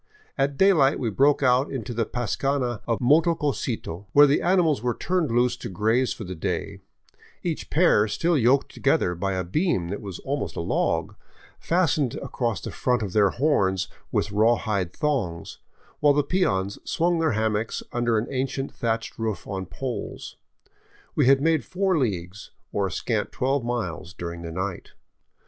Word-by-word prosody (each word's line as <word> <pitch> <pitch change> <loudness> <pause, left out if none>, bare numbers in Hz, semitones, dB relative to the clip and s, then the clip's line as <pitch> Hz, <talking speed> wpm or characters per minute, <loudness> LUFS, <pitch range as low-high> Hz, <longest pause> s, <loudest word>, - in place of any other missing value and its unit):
At 140 0 0
daylight 165 -9 +4
we 115 -4 -2
broke 140 +6 +3
out 130 +2 +3
into 120 -3 -4
the 115 -1 -1
pascana 120 0 -1
of 115 -2 +1
Motococito, 135 - +1
where 145 +1 +8
the 145 +1 +2
ani 180 +1 +3
mals 155 -8 +1
were 120 -1 -1
turned 180 -4 0
loose 120 +1 +2
to - - -7
graze 110 +7 +1
for 110 - -5
the 95 -2 -6
day, 80 - -3 0.6
each 170 -3 -3
pair 150 -10 +4
still 170 +11 +1
yoked 135 +1 +2
to - - -12
gether 90 - +2
by 95 +3 -2
a 95 0 -1
beam 95 - 0
that 100 - -4
was 95 -4 -6
almost 140 +1 -3
a - - -4
log, 85 - 0 0.5
fastened 155 -7 +1
across 115 -7 -3
the - - -6
front 125 -2 0
of 95 -3 -5
their 105 -2 +4
horns 95 - +1 0.2
with 100 - 0
rawhide 105 -4 +1
thongs, 120 - -2 0.4
while 145 -1 +5
the 145 +1 +2
peons 100 - 0
swung 170 0 +1
their 160 -4 +2
ham 110 0 +1
mocks 110 +2 -2
under 120 -1 +1
an 110 - 0
ancient 135 +1 -2
thatched 115 -1 -3
roof 110 -2 -3
on 95 -2 -5
poles. 120 +9 -6 0.8
We - - +2
had 135 0 +5
made 160 -4 +2
four 190 - 0
leagues, 100 - -2 0.2
or 100 -1 0
a - - -7
scant 110 -3 -2
twelve 135 0 0
miles, 90 -8 -4
during 85 -1 -6
the 85 -1 -6
night. 95 +2 -5
120 Hz, 170 wpm, -25 LUFS, 100-145 Hz, 0.8 s, where